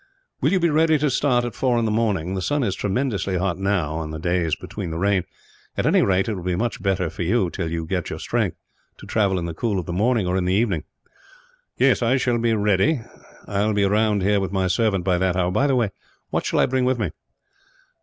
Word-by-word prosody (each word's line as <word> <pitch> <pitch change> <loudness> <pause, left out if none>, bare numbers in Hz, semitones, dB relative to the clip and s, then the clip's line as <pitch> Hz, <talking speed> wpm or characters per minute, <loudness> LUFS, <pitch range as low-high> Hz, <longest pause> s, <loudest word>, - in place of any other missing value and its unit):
"Will 145 - +2
you 190 - +3
be 170 -2 +2
ready 160 +1 +4
to 150 -1 +1
start 125 -2 +2
at 120 - -4
four 125 -2 +1
in 115 - +1
the 110 - 0
morning? 105 -6 0
The 95 - -2
sun 145 +6 0
is 100 -5 0
tremendously 100 -2 -1
hot 90 0 -1
now, 95 -6 0
on 80 -1 -4
the 80 - -5
days 85 -1 0
between - - -6
the 80 - -4
rain; 95 0 +1 0.5
at - - 0
any - - +4
rate, 95 +1 +2
it 110 - -1
will 95 - -5
be 90 0 -1
much 115 +4 -2
better 95 -3 0
for 80 - -7
you, 90 0 +1
till 80 - -3
you 80 0 -3
get 90 0 -2
your - - -5
strength, - - -1 0.4
to - - -12
travel 100 -4 +1
in 85 - -2
the 85 - -4
cool 105 +4 -1
of 90 - -3
the 85 - -4
morning, 110 +2 +1
or 90 +1 0
in 90 - 0
the 90 +1 +1
evening." 100 -7 0 0.9
"I 130 -1 +3
shall 120 -2 +1
be 115 -1 +2
ready. 105 +7 +2 0.5
I 100 0 0
will 110 0 +1
be 100 -1 +2
round 105 0 +2
here, 100 +1 +3
with 95 -1 -3
my 95 -1 0
servant, 95 0 +1
by 90 -2 +2
that 95 -1 +1
hour. 90 -1 +1
By 140 +9 +2
the 135 - +2
way, 115 -5 +1 0.4
what - - -1
shall - - 0
I - - +5
bring 130 0 0
with 130 0 +1
me?" 105 -8 -2
100 Hz, 245 wpm, -23 LUFS, 90-120 Hz, 0.9 s, I